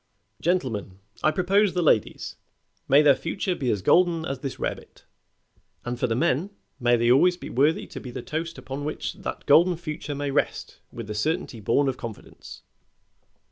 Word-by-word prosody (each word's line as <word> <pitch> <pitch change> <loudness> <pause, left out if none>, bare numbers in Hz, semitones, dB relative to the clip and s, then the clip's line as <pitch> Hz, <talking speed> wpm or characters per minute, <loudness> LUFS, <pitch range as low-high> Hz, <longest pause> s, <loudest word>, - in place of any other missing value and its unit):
Gentlemen, 125 - -1 0.2
I - - +4
propose 190 +4 +2
the 180 - +1
ladies: 110 -9 +1 0.5
May 140 +3 +6
their 145 -2 +7
future 185 +5 -2
be 135 -7 -2
as 100 -5 -1
golden 170 - +3
as 135 -1 -4
this 135 0 -5
rarebit; - - -6 0.8
and 120 0 -4
for - - +1
the 115 - 0
men, 160 - +1 0.3
may 120 -1 +3
they 120 +1 +3
always 175 +7 +5
be - - -8
worthy 145 +6 +2
to - - -8
be 130 - -8
the 120 - -6
toast 165 +2 -4
upon 135 +2 -6
which 150 +1 -3
that - - -6
golden 170 +4 +5
future 155 -3 -5
may 145 0 -2
rest - - -2
with 115 - -7
the 105 - -5
certainty 140 - -2
born 120 +7 +2
of 130 -1 -1
confidence." 115 -3 -10
145 Hz, 180 wpm, -25 LUFS, 120-170 Hz, 0.8 s, their